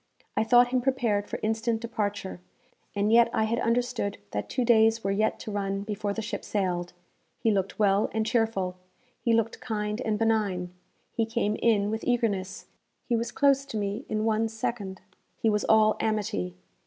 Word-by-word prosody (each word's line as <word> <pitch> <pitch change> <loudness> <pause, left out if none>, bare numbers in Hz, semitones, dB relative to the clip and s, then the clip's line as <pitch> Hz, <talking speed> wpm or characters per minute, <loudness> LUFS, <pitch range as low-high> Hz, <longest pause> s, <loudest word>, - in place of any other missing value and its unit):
I - - +2
thought 245 +2 +5
him 255 0 +1
prepared 235 -6 0
for - - -4
instant 225 +1 0
departure, 205 -5 -3 0.5
and 205 +1 +1
yet 235 0 +6
I 220 - +2
had 230 +2 0
understood 235 -3 0
that 105 - -3
two 250 -2 0
days 225 -1 +4
were 195 - 0
yet 215 +2 +1
to 215 - -6
run 195 -1 -2
before 205 -1 -3
the 225 +2 -3
ship 210 - -4
sailed. 180 -3 -2 0.4
He 225 - +1
looked 195 -2 -1
well 200 -1 +3
and 220 0 0
cheerful. 220 -6 0 0.4
He 235 - +1
looked 230 0 +1
kind 210 -1 -2
and 215 -4 0
benign. 205 -5 0 0.4
He 225 -1 0
came 225 -2 0
in 210 -3 +2
with 220 0 -3
eagerness; 205 -6 -1 0.4
he 240 - +2
was 230 +1 -2
close 275 -1 +3
to 250 -6 -5
me 205 +4 -2
in 215 0 -1
one 225 0 +2
second; 215 -3 -4 0.4
he 225 - +2
was 210 0 0
all 215 0 +5
amity. 200 - -1
220 Hz, 180 wpm, -27 LUFS, 200-230 Hz, 0.5 s, yet